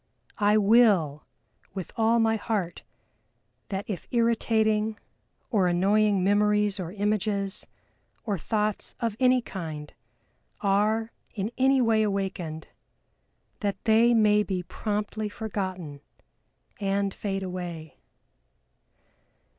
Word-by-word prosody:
I 210 Hz, 0 st, +4 dB
will 200 Hz, -9 st, +4 dB, 0.5 s
with 190 Hz, -3 st, -5 dB
all 225 Hz, +1 st, +3 dB
my 225 Hz, 0 st, +3 dB
heart 205 Hz, -6 st, -2 dB, 0.9 s
that 195 Hz, 0 st, -3 dB
if 195 Hz, -6 st, -5 dB
irritating 220 Hz, -2 st, +1 dB, 0.5 s
or 200 Hz, -6 st, +3 dB
annoying 195 Hz, +2 st, +2 dB
memories 210 Hz, 0 st, +2 dB
or 175 Hz, -2 st, -4 dB
images, 205 Hz, -1 st, -1 dB, 0.6 s
or 205 Hz, -5 st, -2 dB
thoughts 210 Hz, +3 st, -2 dB
of 230 Hz, -3 st, -1 dB
any 255 Hz, -1 st, +4 dB
kind 155 Hz, -8 st, -7 dB, 0.7 s
are 215 Hz, +3 st, +1 dB, 0.2 s
in 205 Hz, +2 st, -2 dB
any 265 Hz, 0 st, +3 dB
way 225 Hz, -1 st, +3 dB
awakened, 190 Hz, -6 st, -3 dB, 0.9 s
that 200 Hz, -2 st, -3 dB
they 230 Hz, +1 st, +4 dB
may 210 Hz, -1 st, +4 dB
be 190 Hz, -3 st, -2 dB
promptly 210 Hz, +3 st, -3 dB
forgotten 185 Hz, -9 st, -5 dB, 0.8 s
and 200 Hz, -1 st, 0 dB
fade 195 Hz, -2 st, -3 dB
away!" 175 Hz, -4 st, -6 dB
205 Hz, 100 wpm, -27 LUFS, 190-220 Hz, 0.9 s, I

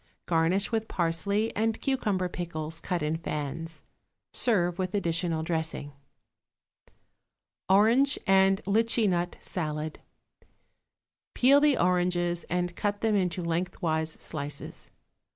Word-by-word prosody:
Garnish 175 Hz, +5 st, +2 dB
with 225 Hz, -1 st, -1 dB
parsley 190 Hz, +6 st, 0 dB
and 225 Hz, +1 st, 0 dB
cucumber 210 Hz, -9 st, 0 dB
pickles 165 Hz, -2 st, -5 dB
cut 175 Hz, -3 st, -2 dB
in 155 Hz, +2 st, 0 dB
fans. 155 Hz, +1 st, -5 dB, 0.5 s
Serve 180 Hz, -7 st, +1 dB
with 185 Hz, +2 st, -2 dB
additional 170 Hz, -3 st, 0 dB
dressing. 160 Hz, -3 st, -2 dB, 1.8 s
=Orange 230 Hz, +8 st, +4 dB
and 195 Hz, -1 st, +4 dB
Litchi 225 Hz, +2 st, +2 dB
Nut 175 Hz, -1 st, 0 dB
Salad.= 155 Hz, -3 st, -4 dB, 1.4 s
Peel 275 Hz, +3 st, +6 dB
the 295 Hz, -3 st, +4 dB
oranges 175 Hz, -1 st, +1 dB
and 175 Hz, 0 st, -1 dB
cut 205 Hz, -1 st, -2 dB
them 220 Hz, -2 st, +2 dB
into 180 Hz, -2 st, 0 dB
lengthwise 165 Hz, -2 st, -1 dB
slices. 145 Hz, -2 st, -6 dB
180 Hz, 105 wpm, -28 LUFS, 165-205 Hz, 1.8 s, Peel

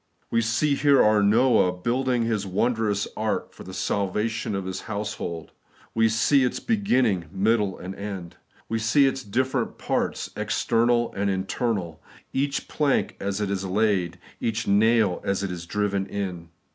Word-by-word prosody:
We 115 Hz, -, +3 dB
see 120 Hz, +6 st, +1 dB
here 140 Hz, -1 st, +4 dB
our 105 Hz, -1 st, +4 dB
Noah 110 Hz, -1 st, +4 dB
building 120 Hz, +6 st, 0 dB
His 110 Hz, -3 st, 0 dB
wondrous 105 Hz, 0 st, 0 dB
ark 110 Hz, 0 st, -2 dB
for -, -, -11 dB
the 95 Hz, -, -9 dB
salvation 100 Hz, +3 st, -1 dB
of 95 Hz, -1 st, -3 dB
His 95 Hz, 0 st, -4 dB
household. 100 Hz, -6 st, -4 dB, 0.4 s
We 115 Hz, 0 st, +3 dB
see 130 Hz, +5 st, +3 dB
its 125 Hz, -, 0 dB
beginning, 130 Hz, -, +1 dB
middle, 100 Hz, 0 st, +1 dB
and 95 Hz, +2 st, -7 dB
end. 95 Hz, -4 st, -7 dB, 0.3 s
We 115 Hz, -, -1 dB
see 115 Hz, +6 st, +4 dB
its 135 Hz, 0 st, 0 dB
different 130 Hz, +4 st, -1 dB
parts, -, -, -2 dB
external 120 Hz, 0 st, +1 dB
and 100 Hz, 0 st, -1 dB
internal; 95 Hz, -3 st, -2 dB, 0.3 s
each 140 Hz, +1 st, -1 dB
plank 145 Hz, -3 st, 0 dB
as 100 Hz, 0 st, -2 dB
it 100 Hz, -1 st, -1 dB
is 100 Hz, -1 st, -2 dB
laid, 95 Hz, -3 st, +1 dB, 0.2 s
each 110 Hz, -1 st, -2 dB
naU 105 Hz, -1 st, +3 dB
as 100 Hz, 0 st, -1 dB
it 95 Hz, -, -2 dB
is 85 Hz, -1 st, -7 dB
driven 100 Hz, -1 st, -1 dB
in. 90 Hz, -4 st, -5 dB
105 Hz, 155 wpm, -25 LUFS, 95-120 Hz, 0.4 s, here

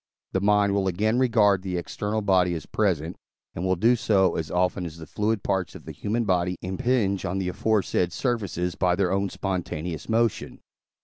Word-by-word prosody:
the 95 Hz, -, 0 dB
mind 100 Hz, 0 st, +3 dB
will 100 Hz, -1 st, +1 dB
again 110 Hz, +6 st, +1 dB
regard 110 Hz, -6 st, +4 dB
the 95 Hz, -2 st, -3 dB
external 105 Hz, +5 st, -3 dB
body 90 Hz, -3 st, +3 dB
as 80 Hz, -, -6 dB
present, 90 Hz, -5 st, -1 dB, 0.4 s
and 85 Hz, -, -5 dB
will 95 Hz, 0 st, +2 dB
do 115 Hz, +7 st, +4 dB
so, 95 Hz, -6 st, +2 dB
as 80 Hz, -2 st, -3 dB
often 90 Hz, +1 st, 0 dB
as 85 Hz, -2 st, -7 dB
the 80 Hz, -, -9 dB
fluid 105 Hz, +3 st, -1 dB
parts 95 Hz, -2 st, -1 dB
of -, -, -11 dB
the -, -, -6 dB
human 115 Hz, +3 st, -2 dB
body 90 Hz, -2 st, +1 dB
impinge 100 Hz, +1 st, 0 dB
on 95 Hz, 0 st, -2 dB
the 95 Hz, -2 st, -1 dB
aforesaid 95 Hz, -3 st, 0 dB
surfaces 95 Hz, -6 st, -2 dB
by 90 Hz, -1 st, +1 dB
their 95 Hz, -1 st, +1 dB
own 100 Hz, +1 st, 0 dB
spontaneous 90 Hz, -4 st, -4 dB
motion. 115 Hz, -1 st, 0 dB
95 Hz, 185 wpm, -25 LUFS, 90-105 Hz, 0.4 s, regard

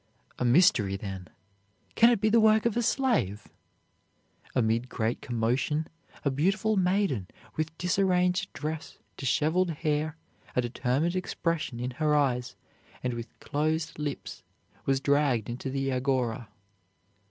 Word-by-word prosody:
"A 125 Hz, -, 0 dB
mystery, 120 Hz, -, +4 dB
then! 95 Hz, -2 st, -6 dB, 0.7 s
Can 230 Hz, -, +6 dB
it 235 Hz, -3 st, +3 dB
be 215 Hz, +2 st, +2 dB
the 230 Hz, +2 st, +5 dB
work 220 Hz, 0 st, +5 dB
of 235 Hz, -, +1 dB
a 240 Hz, -, +2 dB
slave?" 220 Hz, -, 0 dB, 1.1 s
Amid 115 Hz, 0 st, +1 dB
great 115 Hz, -1 st, -1 dB
commotion 125 Hz, +6 st, 0 dB, 0.4 s
a 140 Hz, -, +3 dB
beautiful 195 Hz, -, +1 dB
maiden 185 Hz, -, +1 dB, 0.3 s
with 160 Hz, +1 st, -3 dB
disarranged 180 Hz, +1 st, +1 dB
dress, 155 Hz, +4 st, -5 dB, 0.2 s
disheveled 160 Hz, +7 st, +1 dB
hair, 155 Hz, 0 st, -1 dB, 0.4 s
a 125 Hz, -, +3 dB
determined 130 Hz, +7 st, 0 dB
expression 165 Hz, -7 st, -2 dB
in 125 Hz, +1 st, -2 dB
her 150 Hz, +3 st, +1 dB
eyes, 125 Hz, -4 st, +1 dB, 0.5 s
and 125 Hz, -1 st, -1 dB
with 120 Hz, 0 st, -8 dB
closed 155 Hz, +1 st, -1 dB
lips, 145 Hz, -2 st, -5 dB, 0.5 s
was 135 Hz, -1 st, +3 dB
dragged 140 Hz, -5 st, +1 dB
into 125 Hz, +3 st, -4 dB
the 135 Hz, 0 st, -1 dB
Agora. 125 Hz, -3 st, -1 dB
145 Hz, 130 wpm, -28 LUFS, 125-180 Hz, 1.1 s, Can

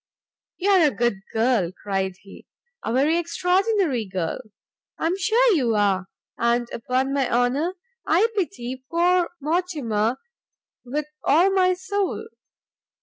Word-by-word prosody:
"You 395 Hz, +2 st, +1 dB
are 365 Hz, -5 st, +6 dB
a -, -, +3 dB
good 240 Hz, -6 st, 0 dB
girl," 225 Hz, -6 st, +1 dB
cried 190 Hz, -1 st, -3 dB
he, 195 Hz, -, -15 dB, 0.4 s
"a -, -, -2 dB
very 290 Hz, +7 st, +2 dB
extraordinary 360 Hz, -, +1 dB
girl! 185 Hz, -1 st, -3 dB, 0.6 s
I -, -, -3 dB
am 340 Hz, +3 st, +1 dB
sure 455 Hz, +4 st, +3 dB
you 245 Hz, -, +1 dB
are; 195 Hz, -2 st, +1 dB, 0.3 s
and 235 Hz, 0 st, +1 dB
upon 255 Hz, +3 st, -1 dB
my 275 Hz, -2 st, +1 dB
honour 265 Hz, +9 st, +1 dB, 0.3 s
I 365 Hz, +8 st, +4 dB
pity 260 Hz, -, -3 dB
poor 345 Hz, +1 st, +2 dB
Mortimer 285 Hz, -9 st, -1 dB, 0.7 s
with 280 Hz, +4 st, -3 dB, 0.2 s
all 345 Hz, +7 st, +4 dB
my 370 Hz, -1 st, +3 dB
soul! 405 Hz, +3 st, -2 dB
285 Hz, 130 wpm, -23 LUFS, 235-360 Hz, 0.7 s, are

